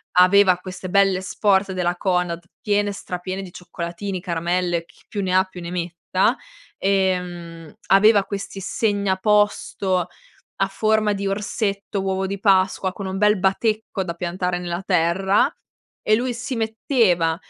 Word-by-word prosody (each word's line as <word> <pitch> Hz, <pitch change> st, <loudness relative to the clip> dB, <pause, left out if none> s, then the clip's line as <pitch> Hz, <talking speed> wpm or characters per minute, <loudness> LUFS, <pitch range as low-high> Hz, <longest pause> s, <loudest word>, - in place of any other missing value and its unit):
aveva 185 Hz, +1 st, +6 dB
queste 185 Hz, 0 st, -8 dB
belle 195 Hz, -1 st, +3 dB
sport 195 Hz, 0 st, +1 dB
della 180 Hz, -1 st, 0 dB
Conad, 180 Hz, -2 st, -1 dB, 0.2 s
piene, 205 Hz, 0 st, +1 dB
stra 180 Hz, -2 st, -6 dB
piene 185 Hz, +2 st, -4 dB
di 185 Hz, -, -10 dB
cioccolatini, 180 Hz, +2 st, -5 dB
caramelle, 175 Hz, -1 st, -1 dB
chi -, -, -23 dB
più 205 Hz, -, -4 dB
ne 185 Hz, -1 st, -1 dB
ha 185 Hz, -, +5 dB
più 185 Hz, -1 st, -11 dB
ne 170 Hz, -, -6 dB
metta, 180 Hz, +5 st, 0 dB, 0.4 s
e, 190 Hz, -1 st, +2 dB
mhmm, 170 Hz, -3 st, -9 dB
aveva 205 Hz, +1 st, +6 dB
questi 200 Hz, 0 st, -6 dB
segnaposto 200 Hz, -2 st, +1 dB, 0.5 s
a 195 Hz, -, +2 dB
forma 215 Hz, +1 st, +1 dB
di 200 Hz, 0 st, -3 dB
orsetto, 200 Hz, 0 st, -2 dB
uovo 190 Hz, 0 st, -1 dB
di 200 Hz, +1 st, -4 dB
Pasqua, 190 Hz, -1 st, +2 dB
con 195 Hz, +1 st, -7 dB
un 190 Hz, 0 st, -3 dB
bel 210 Hz, 0 st, +4 dB
batecco 205 Hz, +1 st, 0 dB
da 170 Hz, -2 st, -4 dB
piantare 180 Hz, +1 st, -2 dB
nella 175 Hz, +1 st, -4 dB
terra 190 Hz, -, +2 dB, 0.5 s
e 215 Hz, -, +2 dB
lui 245 Hz, +3 st, 0 dB
si 250 Hz, +3 st, -5 dB
metteva 220 Hz, -, +1 dB
190 Hz, 145 wpm, -22 LUFS, 180-205 Hz, 0.5 s, aveva